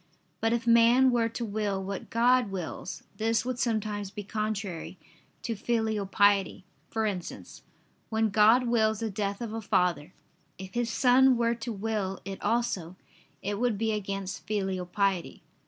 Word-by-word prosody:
But 225 - +1
if 235 0 0
man 235 +3 +6
were 230 -2 +2
to 230 +1 -4
will 205 -2 -2
what 195 0 -5
God 245 0 +3
wills, 185 -1 -6
this 225 +1 +1
would 255 -1 -3
sometimes 215 -4 -1
be 205 +1 -7
contrary 200 -4 -4 0.5
to 230 - -2
filial 220 -2 -1
piety: 195 -1 +2 0.2
for 220 -1 -1
instance, 185 -5 -5 0.5
when 220 0 +1
God 220 +4 +5
wills 220 -2 +2
the 225 -2 -2
death 200 +1 -3
of 225 -2 -4
a 225 - -3
father: 180 -6 +1 0.5
if 190 0 -9
his 240 -1 0
son 255 +1 +5
were 235 0 +2
to 235 +1 -5
will 205 -2 -2
it 195 -1 -6
also, 195 -7 -1 0.5
it 205 +1 -2
would 240 -3 +1
be 220 +1 0
against 195 -4 -4
filial 190 -3 -2
piety. 195 -1 -1
215 Hz, 155 wpm, -28 LUFS, 195-230 Hz, 0.5 s, man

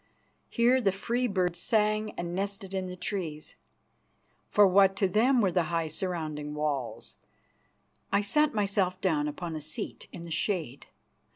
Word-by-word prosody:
Here 245 +2 +3
the 200 -4 +3
free 235 +6 -1
birds 180 -4 0
sang 215 0 +1
and 175 0 -4
nested 195 0 -3
in 190 -1 -2
the 180 - -6
trees, 175 -5 -4 0.9
for 205 - +5
what 195 0 +5
to 195 - +2
them 235 +7 +3
were 190 -3 +2
the 175 -2 +1
high 165 -1 -1
surrounding 155 -4 -4
walls? 145 -5 -3 0.9
I 200 - +3
sat 300 +9 +2
myself 195 -4 0
down 155 -6 +1
upon 160 +2 -5
a 155 - -5
seat 155 +1 -5
in 170 - -8
the 170 - -8
shade. 160 - -2
185 Hz, 155 wpm, -29 LUFS, 165-205 Hz, 0.9 s, for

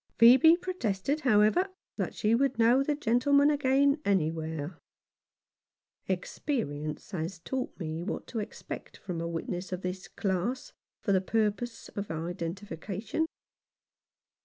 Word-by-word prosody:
Phcebe 260 +9 +8
protested, 285 - -1
however, 235 - +4 0.3
that - - -2
she 215 0 +2
would 265 +2 +2
know 235 +3 +5
the 290 +2 +1
gentleman 280 +3 +4
again 280 +1 +3
anywhere. 160 - -1 1.3
Experience 155 - -3
has 170 0 -3
taught 255 +9 -4
me 160 -1 -3
what 175 - -4
to 230 - -4
expect 210 0 -7
from 175 -4 -5
a 170 - -2
witness 175 +2 -4
of 185 0 -4
this 180 +1 -4
class 200 +6 -2 0.3
for 200 - 0
the 190 -1 +4
purpose 220 +3 -1
of 200 0 -5
identifi 170 +2 -5
cation. 220 - -2
210 Hz, 125 wpm, -30 LUFS, 175-265 Hz, 1.3 s, Phcebe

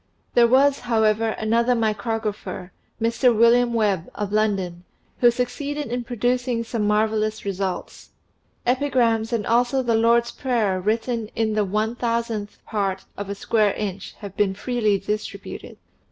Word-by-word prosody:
There 235 -1 +6
was, 275 +3 +4
however, 220 -2 +1
another 235 +3 +2
micrographer, 215 -4 -2 0.3
Mr. 230 +1 +2
William 235 +1 +5
Webb, 205 -7 0
of 205 -1 -3
London, 195 -5 0 0.4
who 240 - +6
succeeded 280 +3 -3
in 245 0 -2
producing 245 0 0
some 225 -2 -2
mar 210 +1 +3
vellous 215 0 -2
results. 190 -2 -4 0.6
Epigrams 245 -4 +1
and 230 -3 -1
also 245 +3 +2
the 235 -2 +1
Lord's 235 +1 +3
Prayer 220 -8 0
written 225 +2 -1
in 220 -1 0
the 210 0 +2
one 215 +4 -1
thousandth 230 -3 -3
part 195 -3 -2
of 200 -1 -6
a 200 - -3
square 210 0 +1
inch 200 -2 -5
have 200 -2 -8
been 200 -2 +1
freely 215 -2 +1
distributed. 210 +2 -5
Mr. - - -40
225 Hz, 145 wpm, -23 LUFS, 210-240 Hz, 0.6 s, There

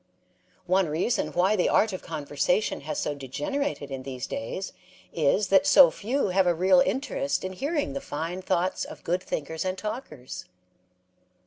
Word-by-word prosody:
One 185 -2 +2
reason 170 +10 0
why 190 +4 +3
the 180 - +2
art 215 -2 +3
of 185 - -5
conversation 155 +6 -1
has 150 +2 -4
so 150 - -1
degenerated 145 - -3
in 135 -1 -4
these 130 -1 -5
days 185 +12 -5 0.4
is 170 +6 +2
that 195 +9 +5
so 280 -2 +8
few 240 +2 -1
have 185 0 +3
a 175 - +3
real 185 +2 +5
interest 265 +7 0
in 185 - -4
hearing 285 - -1
the 275 - -4
fine 170 - -4
thoughts 185 0 0
of - - -9
good 180 +2 0
thinker 160 0 -4
and 185 0 -2
talkers. 150 - -6
185 Hz, 160 wpm, -27 LUFS, 150-215 Hz, 0.4 s, so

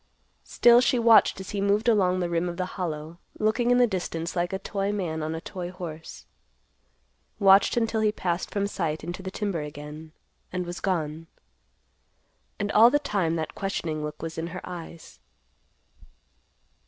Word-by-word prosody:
Still 240 0 +5
she 250 - +2
watched 230 -4 +5
as 190 - -7
he 200 - -2
moved 205 +3 +1
along 185 -5 +3
the 175 - 0
rim 170 +1 0
of 175 - -6
the 185 - -1
Hollow, 165 -2 -5 0.2
looking 220 +3 +1
in 245 - +5
the 250 - +6
distance 175 -5 -3
like 175 +1 0
a 190 - -1
toy 195 +1 -2
man 175 -6 -3
on 155 +1 -3
a 165 - -5
toy 175 0 -6
horse; 170 -3 -8 1.1
watched 195 +2 +5
until 225 -1 +1
he 215 -1 +3
passed 180 -4 -2
from 200 -1 -1
sight 165 -6 -3
into 175 +3 -5
the 190 - -5
timber 195 -4 -2
again, 150 +1 -8 0.4
and 180 0 -3
was 175 +1 -6
gone. 165 -4 -2 1.3
And 205 0 -1
all 230 +3 +7
the 290 - +3
time 200 - -1
that 160 -2 -3
questioning 165 -6 -3
look 150 +1 -6
was 165 0 -5
in 165 - -3
her 180 +2 -7
eyes. 170 -2 -9
180 Hz, 170 wpm, -26 LUFS, 165-205 Hz, 1.3 s, all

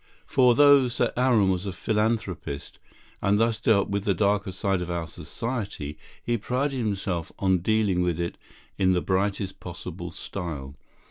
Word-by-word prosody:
For 125 -3 +4
though 145 -2 +7
Sir 120 - 0
Aaron 120 -6 +3
was 95 +1 -1
a - - -2
philanthropist, 95 -6 -2 0.4
and 100 +1 +3
thus 115 -1 +2
dealt 110 -4 +3
with 100 -1 -1
the 100 -2 +1
darker 100 -1 +1
side 95 0 -1
of 90 - -4
our 85 -1 -2
society, 90 - -5 0.3
he 120 -1 0
prided 130 +5 -1
himself 95 -6 -2
on 95 -2 +2
dealing 100 -1 +2
with 85 -2 0
it 85 0 -2 0.4
in 95 -1 +4
the 90 - +1
brightest 95 +1 -1
possible 85 0 -7
style. 80 -6 -6
100 Hz, 155 wpm, -26 LUFS, 90-110 Hz, 0.4 s, though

